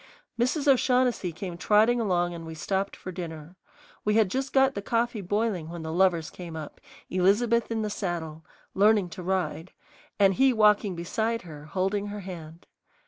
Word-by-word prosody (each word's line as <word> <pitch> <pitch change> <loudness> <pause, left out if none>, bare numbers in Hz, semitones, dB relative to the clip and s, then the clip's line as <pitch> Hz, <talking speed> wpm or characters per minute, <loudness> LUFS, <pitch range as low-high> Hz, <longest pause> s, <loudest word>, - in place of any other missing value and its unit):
Mrs. 275 +5 +1
O'Shaughnessy 250 -7 +3
came 175 0 -7
trotting 220 +5 +4
along 175 -4 +1
and 170 -1 -7
we 160 0 -8
stopped 195 +5 -2
for 185 - -8
dinner. 165 -2 -7 0.5
We 210 0 +1
had 215 -4 +3
just 270 +2 -2
got 270 0 +4
the 200 - -4
coffee 230 +1 -1
boiling 200 -3 -1
when 170 -1 -7
the 160 0 -4
lovers 175 -3 +2
came 170 -3 -8
up, 155 -2 -8 0.3
Elizabeth 215 +6 +2
in 225 -1 -1
the 210 - -2
saddle, 165 -6 -4 0.3
"learning 205 -2 +4
to 180 - -8
ride," 180 -2 -2 0.4
and 195 -1 +5
he 265 +4 +4
walking 210 -3 +3
beside 220 +7 -2
her 150 -4 -10
holding 195 +5 -1
her 205 0 -6
hand. 170 -3 -9
190 Hz, 170 wpm, -27 LUFS, 170-220 Hz, 0.5 s, and